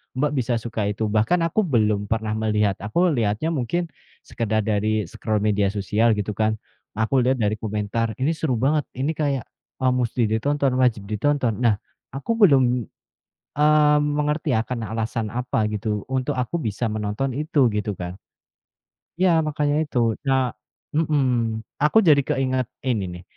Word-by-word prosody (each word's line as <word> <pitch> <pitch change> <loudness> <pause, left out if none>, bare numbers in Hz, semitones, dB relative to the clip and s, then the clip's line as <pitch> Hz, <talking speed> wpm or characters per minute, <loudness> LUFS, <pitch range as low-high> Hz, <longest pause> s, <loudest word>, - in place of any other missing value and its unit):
Mbak 145 +3 +1
bisa 125 -1 0
suka 110 -2 -3
itu. 105 +2 -1
Bahkan 110 +12 +2
aku 215 +6 +1
belum 105 -6 +1
pernah 110 -1 0
melihat. 105 -2 +1
Aku 170 - +1
lihatnya 115 +3 0
mungkin 165 +4 -1 0.4
sekedar 110 -2 -1
dari 110 0 0
scroll 110 +4 -2
media 105 -2 +2
sosial 105 +3 +1
gitu 105 0 -2
kan. 110 0 +1 0.4
Aku 110 +5 +1
lihat 130 +1 +1
dari 105 +1 +1
komentar, 110 +1 -2
"Ini 135 +5 +2
seru 150 -5 0
banget. 145 +4 +1
Ini 135 +5 -1
kayak, 140 -5 -1 0.4
eee, 130 - +4
mesti 125 -1 0
ditonton, 140 +5 +1
wajib 120 -5 +2
ditonton." 120 0 0
Nah 115 -3 +4 0.4
aku 185 +12 -1
belum, 145 - +6 0.9
mmm, 150 0 +4 0.2
mengerti 150 -1 0
ya - - +1
karena 115 -3 -4
alasan 115 0 -2
apa 125 -2 -1
gitu 105 -1 -2
untuk 130 -1 0
aku 125 +6 -1
bisa 110 -2 -2
menonton 110 +5 -2
itu, 150 -3 +2
gitu 105 0 -1
kan. 90 +1 -6 1.0
Ya 175 -3 +4
makanya 150 0 0
itu. 120 -6 0
Nah 130 -2 +1 0.4
mhm. 130 -8 +1 0.2
Aku 150 +9 +5
jadi 150 -7 +5
keinget 130 -2 0 0.2
ini 110 -7 0
nih. - - -14
120 Hz, 155 wpm, -23 LUFS, 110-145 Hz, 1.0 s, belum